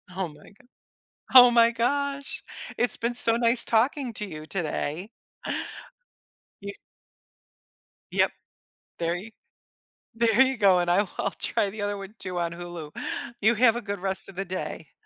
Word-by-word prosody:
Oh 190 Hz, -2 st, -2 dB
my 150 Hz, -1 st, -15 dB
go 215 Hz, +5 st, -23 dB, 0.7 s
Oh 245 Hz, -1 st, +10 dB
my 235 Hz, -1 st, +5 dB
gosh, 280 Hz, +4 st, -2 dB, 0.4 s
it's 245 Hz, -, +1 dB
been 235 Hz, +1 st, -2 dB
so 230 Hz, -1 st, +4 dB
nice 235 Hz, 0 st, +3 dB
talking 245 Hz, +1 st, +1 dB
to 210 Hz, -, -3 dB
you 155 Hz, -3 st, -9 dB
today. 175 Hz, +1 st, -3 dB, 1.5 s
Y 200 Hz, 0 st, -6 dB, 1.4 s
Yep. -, -, +2 dB, 0.7 s
There 170 Hz, 0 st, 0 dB
you 210 Hz, +5 st, -8 dB, 0.8 s
There 230 Hz, +1 st, +2 dB
you 265 Hz, -1 st, +1 dB
go, 195 Hz, -4 st, +5 dB
and 175 Hz, 0 st, 0 dB
I'll 195 Hz, +2 st, +2 dB
I’ll 200 Hz, -, 0 dB
try 200 Hz, -, -1 dB
the 210 Hz, 0 st, -7 dB
other 205 Hz, 0 st, -1 dB
one 195 Hz, +1 st, -9 dB
too 180 Hz, -1 st, -4 dB
on 170 Hz, -1 st, -1 dB
Hulu. 170 Hz, -3 st, -8 dB, 0.5 s
You 220 Hz, +3 st, +4 dB
have 235 Hz, -1 st, +5 dB
a 240 Hz, -, -4 dB
good 200 Hz, -2 st, -5 dB
rest 190 Hz, 0 st, -2 dB
of 195 Hz, -, -12 dB
the 195 Hz, -, -2 dB
day. 180 Hz, -4 st, -6 dB
205 Hz, 155 wpm, -26 LUFS, 180-235 Hz, 1.5 s, Oh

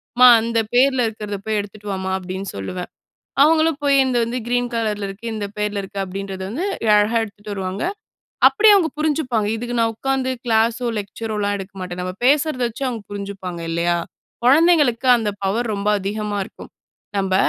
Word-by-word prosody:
"அம்மா! 250 Hz, +1 st, +8 dB
அந்த 230 Hz, 0 st, 0 dB, 0.2 s
பேர்ல 260 Hz, -1 st, +4 dB
இருக்கிறத 210 Hz, -2 st, -6 dB
போய் 215 Hz, -1 st, 0 dB
எடுத்துட்டு 205 Hz, +1 st, -10 dB
வாம்மா!"அப்பிடின்னு 190 Hz, 0 st, -3 dB
சொல்லுவேன். 180 Hz, -, -5 dB, 0.5 s
அவுங்களும் 315 Hz, 0 st, +4 dB
போய் 280 Hz, -1 st, +4 dB
இந்த 250 Hz, -2 st, +1 dB
வந்து 240 Hz, +2 st, -3 dB
கிரீன் 245 Hz, 0 st, 0 dB
கலர்ல 210 Hz, -3 st, -1 dB
இருக்கு. 195 Hz, +4 st, -9 dB
இந்த 205 Hz, -2 st, -3 dB
பேர்ல 210 Hz, -1 st, -1 dB
இருக்கு. 195 Hz, +1 st, -8 dB
அப்பிடின்றது 195 Hz, 0 st, -6 dB
வந்து 305 Hz, -, -3 dB, 0.3 s
அழகா 210 Hz, +3 st, +3 dB
எடுத்துட்டு 205 Hz, 0 st, -11 dB
வருவாங்க. 190 Hz, 0 st, -4 dB, 0.7 s
அப்பிடியே 430 Hz, -1 st, +5 dB
அவுங்க 350 Hz, -5 st, +2 dB
புரிஞ்சுப்பாங்க. 265 Hz, -9 st, 0 dB
இதுக்கு 240 Hz, +2 st, -4 dB
நான் 225 Hz, 0 st, +2 dB
உக்காந்து 265 Hz, +2 st, -1 dB, 0.2 s
கிளாஸோ, 230 Hz, +2 st, +2 dB
லெக்சரோலாம் 205 Hz, 0 st, -3 dB
எடுக்க 195 Hz, +1 st, -9 dB
மாட்டேன். 180 Hz, -1 st, -5 dB
நம்ம 185 Hz, 0 st, -4 dB
பேசுறத 285 Hz, -1 st, +2 dB
வச்சு 235 Hz, +4 st, -6 dB
அவுங்க 235 Hz, -4 st, -5 dB
புரிஞ்சுப்பாங்க. 195 Hz, -4 st, -6 dB
இல்லயா? 170 Hz, +1 st, +1 dB, 0.5 s
குழந்தைங்களுக்கு 285 Hz, -3 st, +4 dB
அந்த 225 Hz, -3 st, -2 dB, 0.2 s
பவர் 225 Hz, +4 st, 0 dB
ரொம்ப 200 Hz, +1 st, -2 dB
அதிகமா 205 Hz, +1 st, -3 dB
இருக்கும். -, -, -13 dB, 0.5 s
நம்ப 190 Hz, -1 st, 0 dB
215 Hz, 160 wpm, -21 LUFS, 195-250 Hz, 0.7 s, அம்மா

